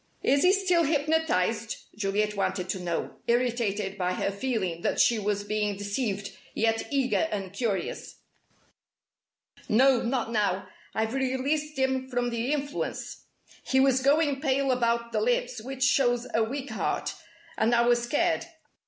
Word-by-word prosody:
"Is 280 +1 +3
he 365 - +6
still 375 -3 +3
hypnotized?" 285 - +1 0.2
Juliet 210 +1 0
wanted 185 -2 -1
to 190 - -2
know, 175 -2 -3
irritated 225 -5 0
by 180 0 0
her 195 - -1
feeling 200 -6 -2
that - - 0
she 235 -2 +4
was 205 0 -1
being 210 -1 -1
deceived, 205 -1 -3 0.2
yet 225 0 +1
eager 275 +3 +1
and 195 -3 -4
curious. 200 -4 -3 1.5
"No, 255 +2 +5
not 235 -1 -1
now. 200 -4 0 0.3
I've 220 +1 0
released 270 +3 -1
him 265 0 0
from 245 -1 -1
the 235 +3 -1
influence. 285 -1 -3 0.4
He 265 - +2
was 265 -1 +4
going 285 0 +2
pale 275 -2 +1
about 235 -1 0
the 215 -2 0
lips, 245 +1 0
which 265 +2 -4
shows 245 -3 +3
a 225 - +3
weak 275 +4 -4
heart, - - -2 0.4
and 230 +2 +2
I 235 - +4
was 240 0 +3
scared. 330 +7 0
240 Hz, 145 wpm, -27 LUFS, 210-270 Hz, 1.5 s, he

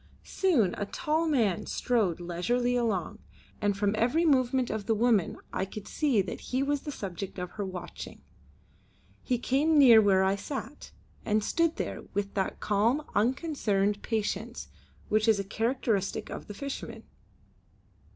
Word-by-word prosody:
Soon 270 - +2
a 205 - -2
tall 315 +7 0
man 230 - +1
strode 215 -9 0
leisurely 235 +9 0
along, 215 -3 -1 0.4
and 205 -2 +1
from 200 0 +1
every 250 +10 +2
movement 260 -3 +2
of 215 -2 -4
the 225 - +2
woman 220 -5 +2 0.2
I - - 0
could 195 +2 -7
see 265 -10 +1
that 180 - -6
he 260 +2 -1
was 285 0 0
the 295 - -5
subject 195 - -6
of 180 -1 -5
her 205 - -4
watching. 180 -2 -7 1.0
He 250 - 0
came 285 +6 +2
near 240 -6 +8
where 195 -2 +4
I 190 +1 +2
sat, 270 +5 -7 0.3
and 215 0 +1
stood 335 +7 +1
there - - -4
with 200 0 -2
that 190 -1 -2
calm 225 +8 +1
unconcerned 210 -5 +1
patience 220 +1 -3 0.4
which 215 +1 +2
is 220 -3 +4
a - - -1
characteristic 220 -1 -1
of - - -7
the 205 - -8
fisherman. 280 +4 -6
220 Hz, 150 wpm, -29 LUFS, 200-260 Hz, 1.0 s, near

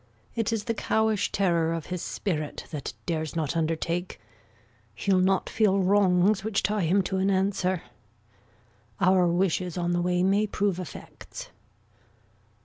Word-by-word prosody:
It 225 -1 -1
is 225 -2 -1
the 230 - -1
cowish 220 -1 0
terror 170 -4 +1
of 165 -2 -4
his 180 - -3
spirit, 155 -7 -3
That 150 -4 -5
dares 160 -2 -2
not 160 -1 -1
undertake. 165 +2 -2 0.8
He'll 195 -2 +2
not 190 +1 +2
feel 210 -3 +2
wrongs 195 +1 +3
Which 215 -1 0
tie 205 -3 +1
him 190 +4 +3
to 190 +1 -2
an 190 +1 +1
answer. 190 -2 0 1.2
Our 185 0 +4
wishes 180 0 0
on 175 0 0
the 175 - +1
way 180 0 +1
May 200 +3 +3
prove 200 -2 -1
effects. 180 - -9
185 Hz, 140 wpm, -27 LUFS, 170-200 Hz, 1.2 s, Our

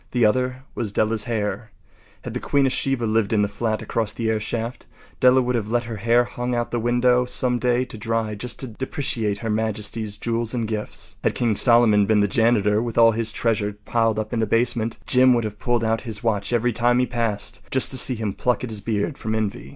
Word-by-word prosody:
The 120 -3 +3
other 125 +4 0
was 110 -4 -3
Della’s 110 +1 +1
hair. 110 -1 -3 0.5
Had - - -6
the - - -3
queen 140 -1 +1
of 130 - +1
Sheba 135 -3 -1
lived 110 -2 +1
in 105 -1 +3
the - - +1
flat 110 +1 -2
across 110 -2 -2
the 115 -1 -2
airshaft, 115 +2 -4 0.3
Della 130 0 +5
would 125 +1 -1
have 110 -3 -2
let 120 +1 +1
her 115 -2 -6
hair 115 +3 +3
hang 125 0 -4
out 120 0 -2
the 120 - -1
window 125 +1 +2
some 125 0 +1
day 125 0 +1
to 110 - -10
dry 115 0 -1
just 120 +4 -6
to 130 - -5
depreciate 115 -3 -3
Her - - -1
Majesty’s 110 -1 -3
jewels 115 0 -2
and 115 -2 -1
gifts. 105 -1 -5
Had - - +1
King 115 -3 +1
Solomon 115 -3 +4
been 110 -1 +3
the 105 - +3
janitor, 105 -1 +2
with 120 -1 -4
all 115 -1 +7
his 115 0 0
treasures 105 -3 -1
piled 115 -2 +1
up 110 +2 -3
in 115 - 0
the 110 - +1
basement, 115 -1 0
Jim 130 -1 +4
would 120 - 0
have 105 -1 -6
pulled 120 -1 0
out 110 0 0
his 110 -2 -6
watch 110 -2 -1
every 120 0 +1
time 120 +2 +2
he 125 - +3
passed, 115 0 -3
just 130 - +4
to 130 - -1
see 125 - +2
him 110 -3 -3
pluck 125 +4 -1
at 125 - -4
his 105 -2 -4
beard 110 +7 -2
from 110 0 -2
envy. 110 +2 -3
115 Hz, 230 wpm, -22 LUFS, 110-120 Hz, 0.5 s, all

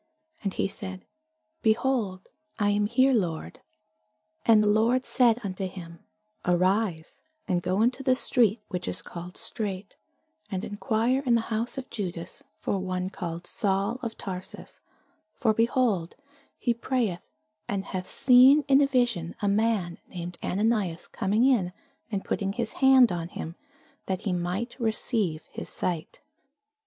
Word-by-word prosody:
And 200 - 0
he - - +1
said, 190 -1 -7 0.6
Behold, 220 -4 0 0.3
I 205 -1 +2
am 205 0 +2
here, 260 +4 +4
Lord. 175 -9 -2 0.9
And 220 -2 +6
the - - +2
Lord 230 +5 +3
said 240 -3 +4
unto 190 -1 -3
him, 170 -3 -10 0.4
Arise, 180 -1 0 0.3
and 180 -3 +1
go 185 +4 +1
into 250 +3 +1
the 255 -1 +3
street 230 -4 +2
which 180 -3 -4
is 90 - -1
called 175 +1 -8
Straight, 200 -2 -4 0.5
and 195 0 -3
enquire 225 +5 0
in 245 -3 +3
the 230 0 -1
house 230 +4 -2
of 265 - -5
Judas 175 -5 -5
for 200 - -2
one 185 0 -3
called 170 -2 -5
Saul, 200 +4 0
of 225 -1 -5
Tarsus: 185 -1 -7 0.6
for, 220 -4 +2
behold, 225 -6 +1 0.4
he 240 - +1
prayeth, 235 -6 -1 0.5
and 195 -1 -2
hath 185 -1 -5
seen 265 +3 +6
in 275 0 +6
a 280 - +4
vision 240 -11 0
a 205 - -1
man 200 -4 +1
named 175 -1 -7
Ananias 200 -4 0
coming 210 +5 +1
in, 210 -10 +2 0.4
and 200 -2 -2
putting 195 -1 -1
his 230 0 -3
hand 265 -4 +7
on 170 -2 -3
him, 165 -1 -7 0.5
that 190 -1 -2
he 195 - -1
might 180 +7 -2
receive 215 -7 +1
his - - -6
sight. 170 -3 -3
205 Hz, 145 wpm, -27 LUFS, 180-235 Hz, 0.9 s, hand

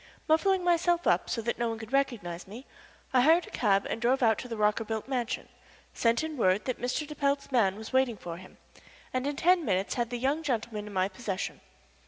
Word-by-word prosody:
Muffling 360 +4 +3
myself 345 0 +2
up - - +2
so 230 - -2
that 235 - -2
no 235 -1 +1
one 225 - -3
could 220 +3 -10
recognize 225 -12 -1
me, 230 +7 -10 0.5
I 255 - +5
hired 325 +6 +5
a - - -13
cab 200 -4 +2
and 225 - -4
drove 255 +2 +2
out 220 -2 +4
to 250 - -6
the 230 -2 -5
Rockerbilt 215 +1 0
mansion, 255 -2 -2 0.5
sent 235 +4 +2
in 315 -2 -4
word 190 -3 +2
that 255 - -3
Mr. 250 +5 -1
de 300 - -8
Pelt's 280 -1 -1
man 210 -7 +3
was 220 +4 -9
waiting 260 -4 +2
for 170 -2 -7
him, 185 +1 -14 0.6
and 255 +2 -1
in 290 - -2
ten 350 +3 +3
minutes 190 -5 0
had 240 -2 -1
the 245 - -3
young 275 +6 0
gentleman 225 -7 -3
in 210 - -9
my 185 0 +2
possession. 195 0 -5
240 Hz, 220 wpm, -29 LUFS, 210-280 Hz, 0.6 s, I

